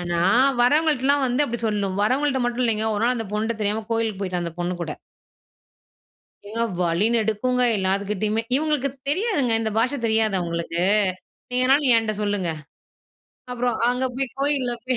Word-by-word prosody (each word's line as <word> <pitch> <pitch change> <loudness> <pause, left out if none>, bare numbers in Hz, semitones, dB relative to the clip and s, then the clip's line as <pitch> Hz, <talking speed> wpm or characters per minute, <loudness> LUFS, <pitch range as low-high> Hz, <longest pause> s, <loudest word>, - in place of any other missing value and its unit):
ஆனா 175 -1 -2 0.4
வரவங்கள்ட்டலாம் 285 0 +2
வந்து 255 +4 +1
அப்டி 240 -3 -4
சொல்லும். 200 -3 -2
வரவங்கள்ட்ட 265 +4 +1
மட்டும் 245 +1 -2
இல்லைங்க, 220 -1 +1
1 210 - -2
நாள் 250 +1 +1
அந்த 225 -2 -4
பொண்ணுட்ட 220 +2 -1
தெரியாம 210 +1 -1
கோயிலுக்கு 225 -3 -2
போய்ட்டேன், 180 -2 -3
அந்த 170 - -5
பொண்ணு 175 +1 -2
கூட. 155 -3 -4 1.6
ஏங்க 230 +2 -2 0.2
வழி 170 +5 +1
நெடுக்குங்க 235 +3 0
எல்லாத்துக்கிட்டயுமே, 200 +3 -1
இவங்களுக்கு 295 -2 0 0.2
தெரியாதுங்க, 345 - +1
இந்த 220 -1 -2
பாஷை 250 +5 +1
தெரியாது 220 -2 +2
அவங்களுக்கு. 170 0 -3 0.7
நீங்க 250 0 +1
எதனாலும் 270 0 +4
என்ட்ட 225 -1 -2
சொல்லுங்க. 205 -4 -1 1.0
அப்புறம், 245 -1 -1
அங்க 250 +1 0
போய் 270 +1 0
கோயில்ல 275 -3 +2
போய், 255 -1 0
225 Hz, 150 wpm, -22 LUFS, 205-255 Hz, 1.6 s, எதனாலும்